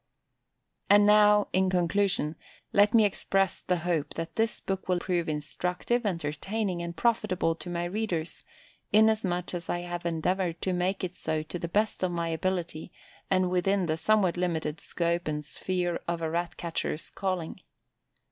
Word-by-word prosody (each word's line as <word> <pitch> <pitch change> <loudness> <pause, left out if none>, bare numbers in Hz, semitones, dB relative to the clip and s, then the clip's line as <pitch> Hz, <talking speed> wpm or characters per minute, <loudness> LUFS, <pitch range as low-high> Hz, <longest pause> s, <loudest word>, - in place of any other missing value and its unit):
And 205 0 +7
now, 210 0 +6
in 190 0 +3
conclusion, 180 -3 +1 0.4
let 205 +2 +5
me 220 -2 +7
express 195 -1 0
the 180 - 0
hope 165 -5 -1
that 165 0 -5
this 225 0 +1
book 190 -1 -4
will 180 - +3
prove 175 -2 -1
instructive, 180 +9 -1
entertaining, 180 +3 -2
and 170 0 -5
profitable 210 -8 +1
to 175 - -8
my 175 0 -2
readers, 175 -3 -2 0.5
inasmuch 210 -5 +3
as 175 -1 -5
I 175 - -1
have 175 0 -5
endeavoured 170 +1 -1
to 185 - 0
make 185 +2 -1
it 185 -1 -2
so 155 -3 -1
to 175 +3 -6
the 170 - -3
best 210 +5 0
of 185 - +1
my 170 -1 -2
ability 170 -1 -2 0.4
and 185 -1 +2
within 185 +1 +2
the 155 -1 0
somewhat 185 +1 +2
limited 165 -3 -1
scope 170 0 -1
and 150 -1 -2
sphere 175 +5 -2
of 170 -1 -2
a 160 - -1
Rat 170 +1 -2
catcher's 165 -2 -3
calling. 185 -2 -3
180 Hz, 160 wpm, -28 LUFS, 170-195 Hz, 0.5 s, And